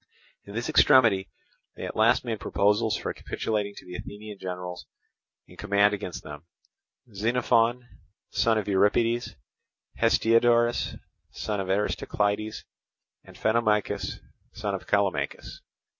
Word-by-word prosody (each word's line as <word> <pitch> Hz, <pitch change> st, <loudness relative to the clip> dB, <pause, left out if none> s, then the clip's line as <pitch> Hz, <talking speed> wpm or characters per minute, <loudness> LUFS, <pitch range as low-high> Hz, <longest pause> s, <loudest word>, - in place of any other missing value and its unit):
In 100 Hz, -, -10 dB
this 120 Hz, +1 st, -2 dB
extremity 120 Hz, -10 st, +5 dB, 0.5 s
they -, -, -6 dB
at -, -, -6 dB
last -, -, +3 dB
made 115 Hz, -3 st, -3 dB
proposals 105 Hz, +2 st, +1 dB
for -, -, -4 dB
capitulating 105 Hz, -2 st, -3 dB
to -, -, -12 dB
the 90 Hz, -, -10 dB
Athenian 105 Hz, +2 st, -8 dB
generals 90 Hz, -1 st, -6 dB, 0.6 s
in -, -, -17 dB
command 100 Hz, +1 st, +3 dB
against 95 Hz, -3 st, -5 dB
them—Xenophon, 115 Hz, -, -2 dB, 0.4 s
son 115 Hz, -1 st, +2 dB
of 105 Hz, -, -2 dB
Euripides, 110 Hz, +4 st, +1 dB, 0.6 s
Hestiodorus, 115 Hz, +1 st, +3 dB, 0.3 s
son 105 Hz, -2 st, -4 dB
of 95 Hz, -, -3 dB
Aristocleides, 105 Hz, +2 st, -1 dB, 0.6 s
and -, -, -15 dB
Phanomachus, 105 Hz, -3 st, +1 dB, 0.4 s
son 105 Hz, -2 st, -3 dB
of 95 Hz, -, -5 dB
Callimachus. 95 Hz, -9 st, -1 dB
105 Hz, 115 wpm, -26 LUFS, 100-115 Hz, 0.6 s, extremity